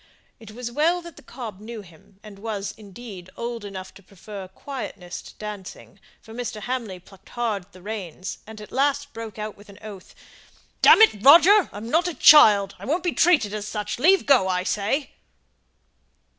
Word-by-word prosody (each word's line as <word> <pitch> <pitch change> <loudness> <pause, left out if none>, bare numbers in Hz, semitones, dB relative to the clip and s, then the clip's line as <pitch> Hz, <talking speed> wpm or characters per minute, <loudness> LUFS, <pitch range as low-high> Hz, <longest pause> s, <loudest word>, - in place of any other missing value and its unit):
It 225 -2 -13
was 240 +1 -6
well 320 +7 +1
that 340 -3 -11
the - - -15
cob 235 -6 -9
knew 220 0 -9
him, 190 +3 -20
and 205 -2 -12
was, 205 -2 -4
indeed, 200 -3 -11
old 235 -1 -5
enough 190 -2 -8
to - - -16
prefer 195 +1 -10
quietness 190 -6 -8
to - - -14
dancing; 210 -3 -9 0.2
for 220 - -13
Mr. 230 -3 -5
Hamley 235 -5 -4
plucked 195 +1 -19
hard 220 -6 -3
at - - -35
the 185 -1 -16
reins, 190 -4 -6
and 220 -1 -10
at 210 - -12
last 285 +1 0
broke 225 -2 -8
out 215 0 -5
with 205 +1 -18
an 200 - -14
oath, 200 -4 -11 0.7
"Damn 445 - +8
it, 210 - +3
Roger! 345 +8 +7
I'm 210 +2 -8
not 340 +3 +2
a 350 - -4
child; 205 -10 +7
I - - -9
won't 325 +5 -1
be 350 - 0
treated 300 - +3
as 210 -1 -5
such. 210 +1 -4
Leave 375 +7 +4
go, 260 -9 +4
I 180 -1 0
say!" 215 +10 -1
215 Hz, 185 wpm, -23 LUFS, 200-255 Hz, 0.7 s, Damn